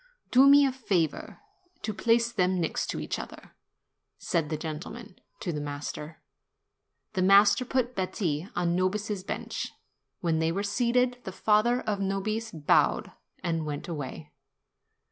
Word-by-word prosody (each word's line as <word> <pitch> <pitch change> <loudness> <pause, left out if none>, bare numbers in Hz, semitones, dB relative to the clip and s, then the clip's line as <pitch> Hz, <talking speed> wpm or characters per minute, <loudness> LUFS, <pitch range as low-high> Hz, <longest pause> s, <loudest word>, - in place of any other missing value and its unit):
"Do 265 +2 +7
me 285 0 +8
the 270 - +2
favor 185 - -1 0.4
to 215 - -2
place 235 +2 +2
them 185 -4 +1
next 165 - -1
each - - -3
other," - - -10 0.7
said 160 -3 -1
the 155 - -2
gentleman 155 0 -7 0.2
to 175 - -2
the 150 - -3
master. 145 +2 -6 0.9
The 185 - 0
master 200 +5 +6
put 255 -1 0
Betti 180 -4 -2
on 175 -1 +1
Nobis's 200 +2 -1
bench. - - -4 0.5
When 165 -2 0
they 160 0 +1
were 195 +4 -2
seated, 245 +4 +1
the 190 - -5
father 220 +6 +2
of 205 -2 -2
Nobis 210 +3 -2
bowed 155 -3 +2 0.3
and 165 -2 -1
went 150 -1 -5
away. 150 -1 -6
190 Hz, 140 wpm, -28 LUFS, 165-225 Hz, 0.9 s, me